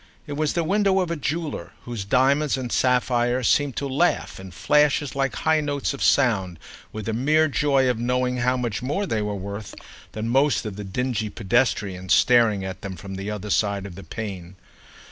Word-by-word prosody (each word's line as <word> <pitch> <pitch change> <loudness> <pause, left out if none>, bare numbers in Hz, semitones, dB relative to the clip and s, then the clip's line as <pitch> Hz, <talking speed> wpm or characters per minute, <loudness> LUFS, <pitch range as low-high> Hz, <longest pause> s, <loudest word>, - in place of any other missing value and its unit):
It 145 - -6
was 150 0 0
the 170 - 0
window 195 +2 +2
of 180 -3 -1
a - - 0
jeweller 155 +1 -4
whose 115 -5 -5
diamonds 135 +6 +2
and 125 -2 -5
sapphires 125 -1 +1
seemed 145 -3 +2
to 140 - -2
laugh, 140 - 0
in 95 0 -9
flashes 145 +8 +2
like 135 -3 0
high 160 -1 +2
notes 145 -1 -2
of 140 - -8
sound, 95 -10 +2 0.3
with 110 -1 -6
the 110 - -2
mere 155 +7 +3
joy 140 -2 +2
of 125 -3 0
knowing 125 +1 0
how 125 +1 +1
much 120 -2 -2
more 150 +11 -1
they 110 - -1
were 105 -1 -2
"worth" 100 +1 -7 0.4
than 110 +1 -4
most 135 +2 +2
of 105 -3 -5
the 105 - -6
dingy 110 +2 -2
pedestrians 100 -4 +1
staring 115 -6 +4
at 95 -1 -6
them 100 -2 -6
from 95 +4 -9
the 95 +2 -5
other 105 -1 -5
side 100 -1 0
of 100 - -8
the 95 +3 -10
pane. 95 -1 -7
125 Hz, 195 wpm, -24 LUFS, 105-140 Hz, 0.4 s, staring